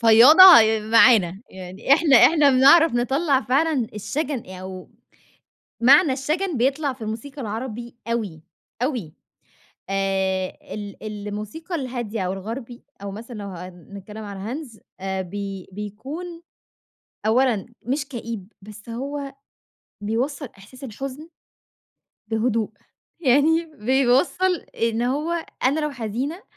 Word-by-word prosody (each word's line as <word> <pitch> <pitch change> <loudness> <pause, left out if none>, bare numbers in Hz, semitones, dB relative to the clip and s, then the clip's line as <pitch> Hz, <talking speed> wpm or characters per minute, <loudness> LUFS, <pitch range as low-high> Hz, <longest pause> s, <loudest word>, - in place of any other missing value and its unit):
فياضة 235 +9 +8
آآ، 225 -12 +8
معانا، 215 -4 +4
يعني 190 +6 -3
إحنا 290 -2 +5
إحنا 300 +2 +6
بنِعرَف 280 +4 +6
نِطَلَّع 270 +3 +1
فعلًا 270 +2 +1
الشجن 270 - -4
أو 185 0 -9 0.9
معنى 280 +5 +6
الشجن 310 +6 -2
بيطلع 275 +4 0
في 255 -2 -13
الموسيقى 225 +6 -6
العربي 235 +2 -6
أوي، 210 -9 -3 0.4
أوي. 240 - -3 0.8
آآ، 190 -1 -1 0.2
ال 205 -1 -7 0.3
الموسيقى 215 - -6
الهادية 245 -7 -4
أو 180 - -2
الغربي 230 +5 -7 0.2
أو 200 - -5
مثلًا 230 +3 -9
لو 205 - -6
هنتكلم 190 +4 -10
على 200 +3 -6
Hans 230 -6 -16 0.2
آآ، 190 0 -3
بي 195 0 -7
بيكون 270 - -7 0.8
أولًا 230 -2 +2 0.2
مش 270 +4 -2
كئيب، 230 -6 -7
بس 210 +2 -13
هو 275 +3 -5 0.7
بيوصَّل 255 +6 -2
إحساس 215 +7 -15
الحزن 270 +6 -7 1.0
بهدوء. 225 -1 0 0.5
يعني 310 +4 +3
بيوصَّل 265 +10 +2
إن 230 -6 -3
هو 310 +6 -1 0.2
أنا 280 +5 +2
لو 300 0 -1
حزينة 265 - -4
235 Hz, 115 wpm, -23 LUFS, 210-280 Hz, 1.0 s, فياضة